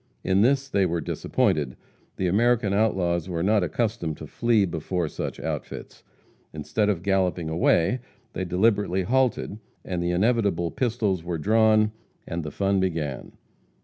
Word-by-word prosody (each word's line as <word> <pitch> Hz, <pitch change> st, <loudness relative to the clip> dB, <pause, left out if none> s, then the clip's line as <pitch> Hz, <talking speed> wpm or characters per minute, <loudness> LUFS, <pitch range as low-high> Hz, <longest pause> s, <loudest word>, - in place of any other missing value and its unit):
In 95 Hz, +1 st, +2 dB
this 135 Hz, +4 st, +3 dB
they 100 Hz, -8 st, +1 dB
were 85 Hz, 0 st, -1 dB
disappointed. 75 Hz, -4 st, -1 dB, 0.4 s
The 95 Hz, -, -2 dB
American 110 Hz, +2 st, +2 dB
outlaws 95 Hz, -5 st, +1 dB
were 85 Hz, -2 st, -2 dB
not 105 Hz, 0 st, +3 dB
accustomed 90 Hz, -2 st, -2 dB
to -, -, -8 dB
flee 115 Hz, -4 st, +2 dB
before 85 Hz, 0 st, -2 dB
such -, -, -5 dB
"outfits." -, -, -6 dB, 0.5 s
Instead 105 Hz, +8 st, -1 dB
of 90 Hz, -4 st, -1 dB
galloping 95 Hz, -4 st, 0 dB
away, 85 Hz, +7 st, +2 dB, 0.3 s
they 95 Hz, -, -3 dB
deliberately 95 Hz, 0 st, +1 dB
halted, 125 Hz, -1 st, 0 dB, 0.3 s
and 90 Hz, -2 st, -3 dB
the 85 Hz, -, -1 dB
inevitable 95 Hz, -3 st, +1 dB
pistols 110 Hz, -8 st, -1 dB
were 85 Hz, -1 st, -3 dB
drawn 110 Hz, +4 st, +3 dB, 0.4 s
and 85 Hz, +1 st, -3 dB
"the 75 Hz, -, -5 dB
fun 100 Hz, +4 st, 0 dB
began." 80 Hz, -8 st, -3 dB
95 Hz, 145 wpm, -25 LUFS, 85-110 Hz, 0.5 s, this